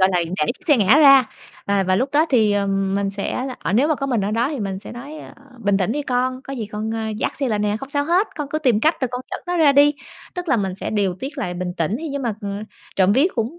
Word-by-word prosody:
gọi 185 - +5
là, 180 - +2 0.2
đẩy 150 - +1
chiếc 370 - -16
xe 295 - +6
ngã 215 +5 +5
ra 275 -4 +8 0.4
và 200 -1 +2
và 185 0 +1
lúc 255 +7 0
đó 310 +3 +3
thì, 220 -6 +4
ừm, 195 -1 0
mình 200 0 0
sẽ 200 +5 -3
là 255 - -6
ờ, - - -2
nếu 255 +8 +3
mà 310 - +3
có 275 -1 -3
mình 245 -5 0
ở 200 +1 -1
đó 230 +4 +1
thì 290 -5 -4
mình 195 -2 -3
sẽ - - -10
nói, 275 +6 -9
ơ: - - -11 0.3
"Bình 205 -2 +2
tĩnh 195 +2 0
đi 295 +3 -2
con, 255 0 -1
có 275 - -8
gì 230 -5 -4
con, 210 +1 -4
ơ, 225 0 -3
dắt - - -2
xe 275 -2 0
lại 215 -3 0
nè, 210 0 0
không 270 - -7
sao 285 0 -1
hết, 360 +7 +2
con 295 -3 -4
cứ 310 - -2
tìm 250 -8 +2
cách 315 +7 +3
rồi 260 - 0
con 250 - -3
dẫn - - -3
nó 355 0 -1
ra 310 -4 +5
đi." 290 +1 +5 0.4
Tức 355 -1 -5
là 270 - +3
mình 195 -4 -2
sẽ - - -5
điều 200 -4 0
tiết 280 +3 -6
lại 180 -9 -3
bình 180 0 -4
tĩnh 170 +6 0
thì 325 - -4
nhưng 280 -1 -4
mà, 235 -4 -1
ừm, 200 0 -5 0.3
trộm 190 +1 +4
vía 270 +8 +4
cũng 240 +8 -3
235 Hz, 305 wpm, -21 LUFS, 200-280 Hz, 0.4 s, ra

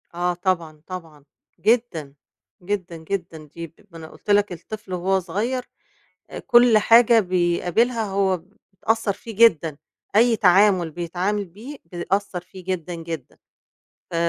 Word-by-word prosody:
آه 175 +1 0
طبعًا، 170 -4 -2
طبعًا. 165 -6 -9 0.3
جدًا، 210 - 0 0.5
جدًا، 180 -2 -4
جدًا، 165 -2 -5
دي 165 -1 -7 0.2
ما 165 - -11
أنا 160 -1 -9
قُلت - - -15
لَك 205 -1 +3
الطفل 205 +3 -8
وهو 190 +2 +1
صغير 215 +9 -2 0.7
آآ - - -6
كُل 240 -2 +5
حاجة 230 +1 +6
بيقابلها 185 +5 +1
هو 195 -2 +1 0.4
بتأثّر 220 +2 0
فيه 220 +2 -10
جدًا، 165 -9 +4 0.4
أي 230 +1 +5
تعامل 185 -3 +4
بيتعامل 180 +5 -2
بيه 215 - -10
بيأثّر 180 +2 -2
فيه 185 +1 -14
جدًا، 180 -2 -3
جدًا. 165 -4 -7 0.7
ف - - -4
185 Hz, 130 wpm, -23 LUFS, 170-210 Hz, 0.7 s, حاجة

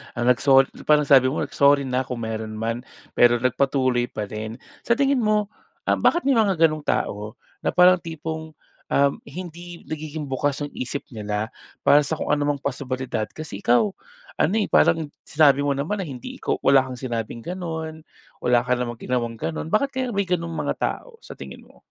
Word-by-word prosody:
ang 120 +1 +3
nagso 135 +2 +5 0.2
parang 150 -1 +5
sabi 135 -2 +6
mo, 135 - -1
"Sorry 140 0 +4
na 130 -1 -1
kung 120 -2 -4
meron 110 -1 -4
man," 115 +2 -2 0.3
pero 120 0 +5
nagpatuloy 130 -1 +1
pa 105 - -5
rin. 110 +2 -6 0.3
Sa 235 - +4
tingin 275 0 +2
mo, 215 -2 +1 0.3
ah - - +1
bakit 345 - +3
may 270 -4 +3
mga 200 -4 +3
ganong 155 -2 +2
tao 105 +2 -1 0.2
na - - -2
parang 180 0 +6
tipong 160 -1 -6 0.3
um, 140 0 +3
hindi 175 +2 -9
nagiging 155 -2 -6
bukas 145 +2 -1
ang 145 - -5
isip 130 +3 -4
nila 105 -1 -3 0.3
para 145 +1 +6
sa 160 - 0
kung - - -1
anumang 145 -1 +1
posibilidad. 130 -4 -3
Kasi 155 -11 -8
ikaw 120 - +3 0.4
ano 200 - +1
eh, 215 - +2
parang 160 -3 +2
sinabi 145 -3 +4
mo 140 -1 0
naman 195 +9 -2
na - - -3
hindi 125 -3 -7
ikaw - - 0
wala 135 -1 +7
kang 130 -1 -7
sinabing 115 -2 -4
ganun, 160 -3 -5 0.4
wala 120 -1 +3
ka 125 - +2
namang 120 -1 -2
ginawang 120 -1 -2
ganun. 160 +3 -4
Bakit 245 +10 +2
kaya 260 0 -1
may 200 -3 0
ganong 170 -2 -2
mga - - -1
tao, 485 -2 -4
sa - - -11
tingin - - -9
mo? - - -20
140 Hz, 185 wpm, -23 LUFS, 125-165 Hz, 0.4 s, wala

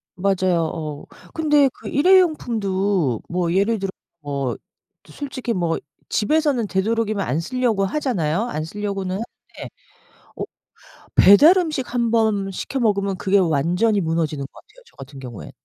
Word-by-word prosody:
맞아요. 185 -2 +1
어 150 -3 -6 0.3
근데 295 -3 +3
그 - - -11
일회용품도 205 - +2
뭐 175 -1 -1
예를 205 +4 +2
들어 195 0 -3 0.3
뭐 140 -4 -3 0.5
솔직히 265 -4 -5
뭐 170 -4 0 0.3
집에서는 280 -1 +1
되도록이면 210 +1 0
안 135 +6 -1
쓰려고 225 +1 0
하잖아요. 195 - -1
안 155 -9 -3
쓰려고는 195 0 -4
하는데 225 +4 -9 0.7
어 - - -4 0.7
배달음식 305 - +5
한번 220 -5 +1
시켜 265 +8 -4
먹으면 200 -4 0
그게 195 +2 +2
완전히 180 +5 +2
무너지는 160 -4 -1
것 - - -13
같아요, - - -19
저 - - -24
같은 135 +1 -11
경우엔. 125 -5 -9
200 Hz, 300 characters per minute, -21 LUFS, 170-240 Hz, 0.7 s, 배달음식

